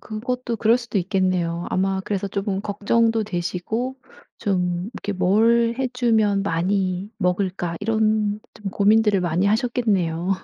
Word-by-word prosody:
그것도 240 +2 -4
그럴 230 +3 +3
수도 235 -3 -5
있겠네요. 180 -2 0
아마 190 0 0
그래서 200 -1 -2
쪼금 195 0 -2
걱정도 220 +2 +1
되시고 205 +7 -3 0.4
좀 180 -1 -1
이렇게 205 - -4
'뭘 230 +5 +3
해 260 -1 0
주면 220 -5 +2
많이 185 +2 -1
먹을까?' 180 -2 -1
이런 215 -1 +1
좀 205 -3 -6
고민들을 210 -1 +3
많이 175 +3 +1
하셨겠네요. 200 -7 0
205 Hz, 295 characters per minute, -22 LUFS, 185-225 Hz, 0.4 s, 그럴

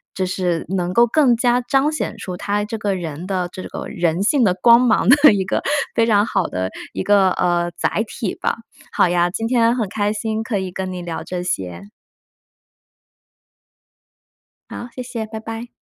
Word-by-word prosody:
就 190 - -1
是 180 -2 -1
能 180 -1 -1
够 235 +4 +6
更 250 0 +3
加 245 +1 +2
彰 275 +4 +1
显 310 - -3
出 180 - -6
他 205 +3 -2
这 225 +1 -5
个 200 -2 -1
人 170 -1 -6
的 185 -2 -1
这 185 - -8
个 - - -7
人 175 -2 -1
性 260 +5 +3
的 185 -5 +3
光 235 +5 +6
芒 245 -3 +2
的 290 +3 +7
一 195 -2 0
个 190 - -1 0.3
非 230 - +3
常 205 -2 +4
好 - - 0
的 95 +1 -3 0.2
一 - - -3
个， 200 -2 +4
呃， 175 -1 +1
载 215 - 0
体 210 -2 -4
吧。 - - -1 0.4
好 - - +3
呀， 175 0 +2
今 225 +5 -3
天 235 -1 +3
很 225 -5 -1
开 205 +1 -1
心 215 +1 -2
可 225 -2 -2
以 190 -1 -3
跟 185 +1 -4
你 180 -1 -5
聊 170 -2 -5
这 180 -1 -4
些。 95 - -4 2.9
好， 240 - -7
谢 255 - -6
谢， 240 -3 -5
拜 220 0 -7
拜。 225 +1 -7
205 Hz, 200 characters per minute, -20 LUFS, 180-235 Hz, 2.9 s, 的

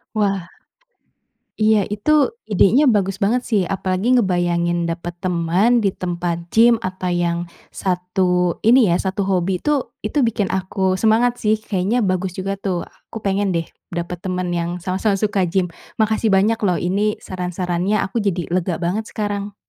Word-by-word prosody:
Wah. 195 -4 0 1.1
Iya 215 -1 +4
itu 210 +8 -1 0.4
idenya 220 +7 +4
bagus 195 -5 +2
banget 225 +5 +1
sih. 210 -4 +3
Apalagi 190 +6 0
ngebayangin 175 -5 +1
dapat 170 +1 -4
teman 185 +6 +2
di 195 - +3
tempat 175 -2 -3
gym 230 +1 +6
atau 185 -3 -4
yang 175 -1 0 0.4
satu 180 -1 0
ini 240 +1 +6
ya, 170 - +3
satu 190 +1 -2
hobi 185 -1 0
itu 295 +1 -1 0.2
itu 255 - -2
bikin 220 -4 +1
aku 190 0 0
semangat 225 +4 +3
sih. 215 0 +2
Kayaknya 210 +2 -1
bagus 185 0 -1
juga 195 +1 -2
tuh. 190 -3 -3
Aku 225 - -11
pengen 195 0 +1
deh, 165 -2 -1 0.2
dapat 175 0 -5
teman 185 -1 -2
yang 170 +1 -2
sama-sama 190 +3 -1
suka 205 -1 0
gym. 185 +1 +1 0.3
Makasih 220 0 +2
banyak 200 +4 +3
loh. 185 -4 +2
Ini 205 +4 0
saran-sarannya 180 +2 -2
aku 220 +3 -2
jadi 185 -4 -1
lega 180 -1 0
banget 190 +6 -2
sekarang. 205 -1 -3
190 Hz, 150 wpm, -20 LUFS, 180-215 Hz, 1.1 s, gym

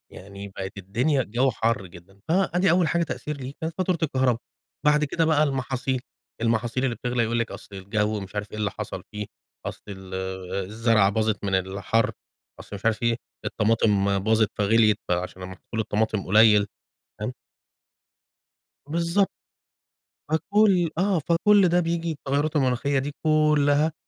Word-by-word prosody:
يعني 100 +1 -9
بقت 95 +1 -6
الدنيا 125 +10 0
الجو 125 +4 +1
حر 110 -4 -1
جدًا 95 +2 -16
فأدي 180 0 +2
أول 175 -2 +3
حاجة 170 +2 +1
تأثير 150 -2 -4
ليه 135 0 -6
كانت 160 0 -3
فاتورة 185 -2 +1
الكهربا 130 -5 +2 0.5
بعد 150 0 +4
كده 165 +3 0
بقى 155 -1 +3
المحاصيل، 130 -2 -1 0.4
المحاصيل 115 +3 0
اللي 125 - 0
بتغلي 125 0 -1
يقول 115 +1 0
لِك 115 - -1
أصل 100 - -10
الجو 105 +2 -1
مش 95 +1 -9
عارف 105 +1 -4
إيه - - -7
اللي 105 -1 0
حصل - - -6
فيه 105 -1 -4 0.4
أصل - - -6
ال 95 -1 -8 0.5
الزرعة 110 -1 +2
باظت 110 0 0
من 100 -1 0
الحَر، 95 +4 0 0.5
أصل 100 - -8
مش 100 - -13
عارف 115 +1 +1
إيه؟ 115 0 +2 0.3
الطماطم 105 -3 +2
باظت 110 +1 +2
فغليت 105 +1 +4
عشان 90 +1 -2
محصول 95 +4 -6
الطماطم 110 -1 -1
قليل 105 +1 +6 0.5
تمام؟ - - -2 1.5
بالضبط. 170 +5 +1 1.0
فكل 180 +2 +3
آه 190 -1 +2
فكل 180 +5 +4
ده 175 +1 +3
بييجي 170 -1 -1
التغيرات 145 +2 -1
المناخية 135 +1 +1
دي 140 +2 -3
كلها 150 -1 +3
120 Hz, 145 wpm, -25 LUFS, 105-155 Hz, 1.5 s, قليل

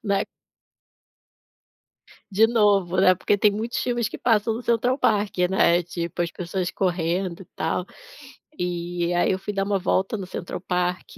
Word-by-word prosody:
né 200 -1 +1 2.1
De 220 +4 +5
novo, 205 -6 +2
né, 185 -1 +6
porque 205 - +1
tem 210 - +5
muitos 220 +4 -3
filmes 240 -3 -1
que - - -8
passam 225 -1 +2
no 240 - -5
Central 245 +3 +1
Park, 205 -3 +1
né? 175 -2 +4
Tipo 170 0 -4
as 170 - -2
pessoas 180 +1 -3
correndo 180 0 -1
e - - -13
tal. 170 +3 -1 0.7
E 175 0 -2
aí, 175 - +2
eu 190 - -1
fui 205 +2 -5
dar 195 0 0
uma 200 -1 0
volta 195 +3 0
no 190 - -5
Central 175 - -6
Park. 180 0 -2
190 Hz, 160 wpm, -24 LUFS, 175-210 Hz, 2.1 s, né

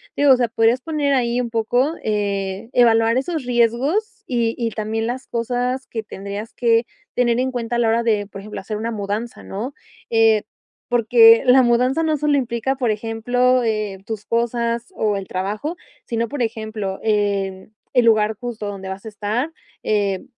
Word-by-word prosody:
digo, 285 -1 +5
o 255 - +7
sea, 245 - +1
podrías 230 +2 +2
poner 295 -2 0
ahí 240 -2 +1
un 240 -2 -2
poco, 245 +6 +1
eh, 200 0 -2
evaluar 230 -1 +4
esos 310 0 -3
riesgos 275 - 0
y 235 -7 0
y 230 -2 -1
también 220 +1 -2
las 250 +3 -4
cosas 245 +2 -2
que 225 - -4
tendrías 200 +1 -7
que 230 -1 +2 0.3
tener 240 -1 +2
en 260 +1 0
cuenta 240 -1 -3
a 240 - +1
la 230 - +3
hora 230 +1 +2
de, 215 -3 +1
por 195 -1 -10
ejemplo, 210 +1 -7
hacer 210 +2 -5
una 225 +2 -3
mudanza, 215 +1 -4
¿no?, 235 +8 -5 0.3
eh, 225 -2 +4 0.5
porque 230 -1 +6
la 255 +1 +6
mudanza 250 +5 +2
no 315 -1 +1
solo 295 0 +2
implica, 245 +1 -1
por 245 -4 +1
ejemplo, 245 +4 +1
eh, 215 -4 -2
tus 220 -2 -5
cosas 235 +5 -1
o 210 - 0
el 195 - -6
trabajo, 210 - -3 0.3
sino, 230 -1 -2
por 290 - -4
ejemplo, 220 -4 -3
em, 200 -2 -1 0.2
el 245 -2 +4
lugar 215 -1 +3
justo 235 -4 -5
donde 195 -1 -6
vas 190 +1 -6
a - - -5
estar, 215 +8 -2 0.3
eh, 200 -3 0
230 Hz, 175 wpm, -21 LUFS, 215-245 Hz, 0.5 s, o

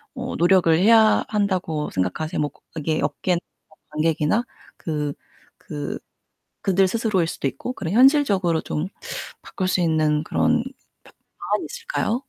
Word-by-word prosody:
어 255 0 -4
노력을 175 -1 +4
해야 220 +2 +5
한다고 185 -7 -1
생각하세요? 95 - -2
뭐 145 - 0 0.2
그게 155 0 -1
업계나 180 -2 0 0.3
뭐 155 - -22 0.2
관객이나 155 +8 +1 0.3
그 150 -3 -3 0.4
그 75 - -6 0.6
그들 190 0 +3
스스로일수도 190 -9 0
있고 190 - -6
그런 170 -8 -4
현실적으로 220 - +4
좀 150 +4 -3 0.6
바꿀 185 -1 -3
수 185 - +1
있는 155 -2 +2
그런 240 +6 +1 0.4
브 - - -17 0.3
방안이 - - -1
있을까요? 470 - -2
180 Hz, 295 characters per minute, -23 LUFS, 155-220 Hz, 0.6 s, 해야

